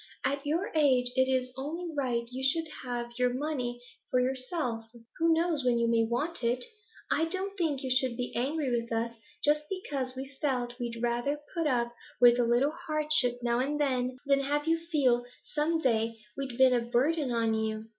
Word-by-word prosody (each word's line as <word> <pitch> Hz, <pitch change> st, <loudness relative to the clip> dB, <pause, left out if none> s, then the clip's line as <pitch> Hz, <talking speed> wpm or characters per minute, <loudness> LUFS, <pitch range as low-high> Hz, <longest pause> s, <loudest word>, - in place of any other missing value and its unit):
At 280 Hz, +1 st, -1 dB
your 335 Hz, +7 st, 0 dB
age 260 Hz, -5 st, +3 dB
it 260 Hz, 0 st, +3 dB
is 255 Hz, -1 st, 0 dB
only 325 Hz, +5 st, -4 dB
right 250 Hz, -4 st, 0 dB
you 260 Hz, +1 st, -5 dB
should 320 Hz, +5 st, +1 dB, 0.2 s
have 240 Hz, -1 st, -4 dB
your 250 Hz, 0 st, +3 dB
money 255 Hz, -4 st, -2 dB, 0.3 s
for 255 Hz, -, +2 dB
yourself; 255 Hz, -2 st, -1 dB, 0.3 s
who 330 Hz, 0 st, +4 dB
knows 325 Hz, -3 st, +2 dB
when 245 Hz, -1 st, +3 dB
you 235 Hz, 0 st, +2 dB
may 230 Hz, -1 st, +3 dB
want 250 Hz, +8 st, -1 dB
it? 245 Hz, +1 st, +1 dB, 0.5 s
I 325 Hz, -, +3 dB
don't 380 Hz, +4 st, -1 dB
think 315 Hz, -8 st, -1 dB
you 260 Hz, -, -1 dB
should 255 Hz, -2 st, +2 dB
be 245 Hz, -, -4 dB
angry 275 Hz, +2 st, 0 dB
with 235 Hz, -1 st, -1 dB
us, 230 Hz, +1 st, -1 dB, 0.3 s
just 300 Hz, +1 st, +3 dB
because 280 Hz, -9 st, -3 dB
we've 270 Hz, +1 st, -7 dB
felt 250 Hz, -3 st, -1 dB
we'd 235 Hz, -1 st, -4 dB
rather 240 Hz, +5 st, 0 dB
put 335 Hz, -3 st, 0 dB
up 240 Hz, -3 st, +1 dB, 0.3 s
with 245 Hz, 0 st, +7 dB
a -, -, +4 dB
little 240 Hz, +5 st, +3 dB
hardship 305 Hz, -7 st, +1 dB
now 240 Hz, 0 st, +1 dB
and 290 Hz, +3 st, -1 dB
then 255 Hz, -3 st, 0 dB
than 275 Hz, 0 st, +4 dB
have 290 Hz, +2 st, 0 dB
you 330 Hz, 0 st, +3 dB
feel 255 Hz, -6 st, +3 dB, 0.3 s
some 310 Hz, +2 st, +1 dB
day 230 Hz, -4 st, +1 dB, 0.2 s
we'd 270 Hz, -3 st, -5 dB
been 260 Hz, -1 st, +6 dB
a 240 Hz, -, +3 dB
burden 260 Hz, +4 st, +1 dB
on 230 Hz, -1 st, +1 dB
you. 220 Hz, 0 st, -2 dB
260 Hz, 190 wpm, -30 LUFS, 240-295 Hz, 0.5 s, with